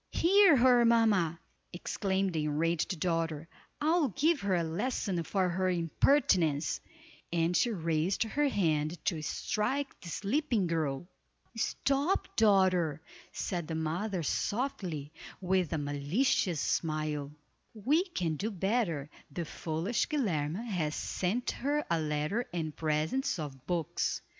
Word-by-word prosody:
"Hear 385 -2 +5
her, 245 -1 +5
mamma," 210 -8 +3 0.3
exclaimed 190 +1 -1
the 155 -2 -1
enraged 165 +4 0
daughter, 165 -2 -1 0.3
"I'll 315 +1 +3
give 295 - +1
her 200 -2 +1
a 170 - +1
lesson 185 +1 -1
for 185 +3 0
her 185 +1 0
impertinence," 170 - +2 0.5
and 170 +1 +1
she 240 - +3
raised 165 -1 0
her 290 +6 0
hand 160 - 0
to 160 -4 0
strike 260 - -2
the 170 - -8
sleeping 230 - 0
girl. 160 -2 -1 0.5
"Stop, 275 - 0
daughter," 185 -7 +3 0.3
said 175 -4 -3
the 160 - -3
mother, 170 +4 -2
softly, 180 - -2 0.3
with 185 -2 +1
a 160 - 0
malicious 150 - 0
smile, 155 -2 -1 0.4
"we 280 - +2
can 175 - -2
do 210 +7 -2
better. 190 - -1 0.2
The 165 +4 -4
foolish 165 +9 -2
Guilerme 190 - -1
has 160 -8 -1
sent 205 +7 -1
her 290 +3 -1
a 170 - +3
letter 155 +9 -1
and 160 -3 -3
presents 160 - 0
of 140 -5 -7
books. 170 -4 -1
180 Hz, 125 wpm, -31 LUFS, 160-230 Hz, 0.5 s, Hear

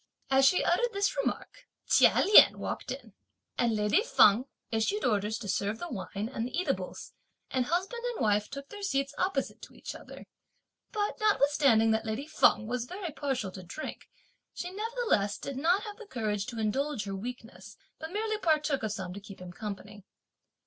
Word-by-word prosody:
As 270 0 +5
she 360 - +4
uttered 475 +7 +1
this 400 0 0
remark, - - -3 0.2
Chia - - +5
Lien 415 - +8
walked - - -5
in, - - -7 0.5
and 235 -2 +2
lady 210 - +3
Feng 240 - +5 0.3
issued 225 - 0
orders 210 -1 +1
to 220 - -7
serve 200 +2 -1
the 345 - -6
wine 200 -1 -4
and 225 - -2
the 285 - -3
eatables, 190 - -3 0.4
and 255 -2 +1
husband 380 +9 -1
and 485 -1 -3
wife 210 -2 +1
took 280 0 -8
their 410 - -9
seats 275 -7 -1
opposite 365 -8 -1
to - - -12
each - - -7
other; - - -11 0.7
but 420 +1 -2
notwithstanding 280 - +4
that 220 0 +1
lady 220 +6 -3
Feng 300 -7 +3
was 245 +1 -2
very 365 +3 -6
partial 270 -9 -2
to 185 - -9
drink, 185 - -8 0.5
she 355 - -5
nevertheless 425 - 0
did 275 - -6
not 345 +8 +2
have 415 -2 -7
the 450 -3 -11
courage 210 - -2
to 240 -2 -6
indulge 225 +3 -1
her 195 -1 -4
weakness, 210 -3 -8 0.2
but 320 +1 -7
merely 430 +1 -1
partook 305 -5 +1
of 220 - -2
some 190 -3 -5
to 200 - -7
keep 200 -1 -12
him 180 -1 -9
company. 205 0 -7
265 Hz, 180 wpm, -30 LUFS, -, 0.7 s, Lien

